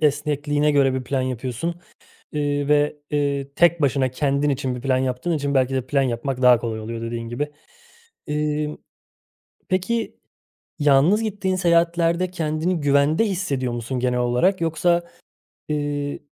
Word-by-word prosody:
esnekliğine 145 0 +1
göre 135 -2 +3
bir 130 -1 -3
plan 135 -1 -1
yapıyorsun, 130 +6 -3 0.6
eee, 145 -1 -1
ve, 150 0 +3
eee, 140 -2 -1
tek 170 -1 +4
başına 130 -1 +2
kendin 140 +2 0
için 130 -2 -1
bir 125 - -7
plan 130 0 +1
yaptığın 130 +6 -1
için 140 -2 -1
belki 130 0 +2
de 130 -1 -2
plan 140 0 +2
yapmak 130 +1 -2
daha 125 -2 +7
kolay 110 -2 -3
oluyor 115 +1 -5
dediğin 115 0 -4
gibi. 145 +5 -3 0.7
Eee, 150 0 -1 0.9
peki 190 +5 -1 0.6
yalnız 150 +9 +4
gittiğin 195 -3 -1
seyahatlerde 170 0 +2
kendini 160 +1 -1
güvende 145 +7 +3
hissediyor 145 - -2
musun 120 +2 -3
genel 125 0 0
olarak? 125 +11 +2
Yoksa, 170 +2 +1 0.7
eee, 145 -1 -2
145 Hz, 140 wpm, -22 LUFS, 130-165 Hz, 0.9 s, daha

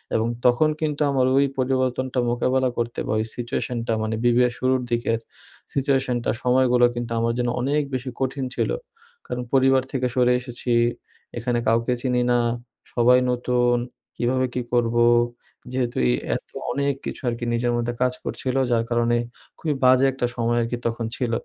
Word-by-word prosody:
এবং 110 +1 +1 0.2
তখন 125 +5 +4
কিন্তু 150 -1 -1
আমার 130 -2 +2
ওই 140 - +5
পরিবর্তনটা 130 0 0
মোকাবিলা 130 +2 +1
করতে 120 0 -2
বা - - 0
ওই 110 - 0
সিচুয়েশনটা 120 -1 -2
মানে 110 0 -1
বিবিএর 120 0 +4
শুরুর 130 0 +2
দিকের 115 -1 0 0.5
সিচুয়েশনটা 135 -3 +1
সময়গুলো 125 -1 +4
কিন্তু 120 -1 -4
আমার 115 0 +1
জন্য 120 -1 0
অনেক 145 +3 +1
বেশি 130 +1 -3
কঠিন 135 0 -1
ছিল। - - 0 0.6
কারণ 125 0 -3
পরিবার 135 -1 +4
থেকে 130 -2 0
সরে 125 -1 +4
এসেছি। 125 -1 -5 0.7
এখানে 120 0 0
কাউকে 115 +2 +2
চিনি 125 -1 +1
না। 120 - +4 0.5
সবাই 125 +1 +5
নতুন। 125 0 +1 0.4
কীভাবে 130 +2 +1
কি 125 - -1
করবো? 120 0 +3 0.7
যেহেতু 125 -2 -2
এই - - +3 0.2
এত - - -7 0.2
অনেক 140 0 0
কিছু - - -5
আরকি 120 0 -4
নিজের 120 +1 +1
মধ্যে 120 0 -1
কাজ 125 0 +2
করছিলো 130 0 -2
যার 115 -1 +3
কারণে 120 0 +2 0.4
খুবই 155 -3 -1
বাজে 130 +1 +6
একটা 130 -1 -2
সময় 120 0 0
আরকি 115 +1 -2
তখন 115 0 -2
ছিল। 125 -3 -2
125 Hz, 160 wpm, -23 LUFS, 120-130 Hz, 0.7 s, বাজে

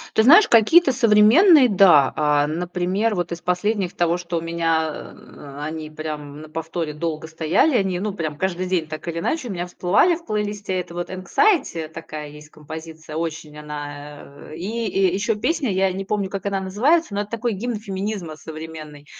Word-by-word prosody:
Ты 220 - +4
знаешь, 340 - +8
какие-то 265 +7 +5
современные- 250 - +6
да. 180 -9 +5
А, 150 -1 +2
например, 180 +6 -1
вот 175 -3 -2
из 170 - -5
последних, 185 +2 -1
из - - -23
того, 175 0 +1
что 175 -1 -3
у - - -4
меня, 165 -1 0 0.3
а, 145 0 -11
они 155 0 -5
прямо 155 -1 -6
на 150 +2 -11
повторе 160 0 -4
долго 160 0 -4
стояли, 165 - +2
они, 190 -4 0
ну, 210 0 -2
прям 155 -5 -4
каждый 185 +1 -2
день 180 -4 0
так 155 +1 -7
или 165 0 -3
иначе 260 - -2
у - - -4
меня 175 -1 -4
всплывали 190 - +2
в 335 - -14
плейлисте. 205 -2 -3
Это 170 - -9
вот 175 +1 -5
"Anxiety" 190 - +1
такая 155 -2 -8
есть 150 +1 -13
композиция, 160 +1 -9
очень 155 -2 -5
она, 145 -1 -9
э. 155 - -8
И 220 +6 -3
и 190 -2 +1
ещё 210 +2 0
песня, 285 +2 -1
я 190 0 +1
не 195 +1 -5
помню, 200 -1 -2
как 195 +1 -6
она 195 -1 -1
называется, 225 - +1
но 200 - -1
это 210 - -11
такой 230 0 -2
гимн 230 +4 -3
феминизма 195 -5 -5
современный. 155 -1 -9
180 Hz, 190 wpm, -22 LUFS, 155-210 Hz, 0.3 s, знаешь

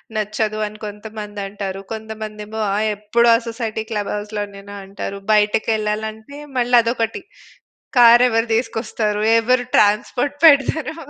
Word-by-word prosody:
నచ్చదు 215 0 -2
అని 215 0 -12
కొంతమందంటారు. 205 -2 -6
కొంతమందేమో 220 0 -7
ఆ - - 0 0.2
ఎప్పుడూ 230 +3 +2
ఆ - - +4
సొసైటీ 225 -1 -4
క్లబ్ 205 -2 -2
హౌస్‌లోనేనా 205 -1 -6
అంటారు. 200 0 -6
బయటకెళ్ళాలంటే, 215 +4 -1 0.2
మళ్ళా 245 0 +4
అదొకటి 230 -1 -2 0.8
కార్ 240 +1 +8
ఎవరు 225 0 +1
తీసుకొస్తారు? 220 -2 -2 0.2
ఎవరు 245 +2 +1
ట్రాన్స్‌పోర్ట్ 235 +7 +2
పెడతారు. 310 +2 +4
215 Hz, 110 wpm, -20 LUFS, 210-230 Hz, 0.8 s, కార్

